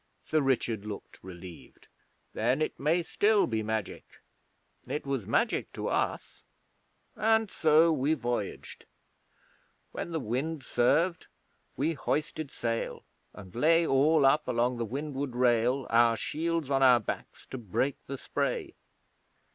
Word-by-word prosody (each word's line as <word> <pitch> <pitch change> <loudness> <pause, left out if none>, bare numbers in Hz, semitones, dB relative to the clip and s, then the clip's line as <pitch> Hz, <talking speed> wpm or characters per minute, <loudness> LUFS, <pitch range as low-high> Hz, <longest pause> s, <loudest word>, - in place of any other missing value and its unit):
Sir 155 - +1
Richard 120 -6 0
looked 105 -1 -9
relieved. 90 -2 -12 0.5
'Then 125 +5 +1
it 155 - -2
may 160 +5 +2
still 205 +4 +3
be 110 -2 -1
magic. 110 0 -3 0.8
It 150 - -3
was 135 -7 -2
magic - - 0
to - - -3
us. - - -2 0.7
And 220 -1 +2
so 160 +1 +4
we 150 +2 +1
voyaged. 120 -6 -4 1.0
When - - -5
the 165 - -1
wind 135 +5 -3
served 155 +9 +1 0.5
we 150 +6 +1
hoisted 155 0 -2
sail, 115 -3 -3 0.3
and 95 -3 -12
lay 165 +7 +4
all 145 +1 +4
up 150 +3 +3
along 125 0 +1
the 115 - -2
windward 140 +1 -4
rail, 125 +1 +2
our 115 0 +4
shields 165 0 -2
on 135 0 +2
our 125 -2 +7
backs - - -6
to 130 - -5
break 120 +6 -1
the 135 - -5
spray. - - -2
135 Hz, 130 wpm, -29 LUFS, 120-155 Hz, 1.0 s, our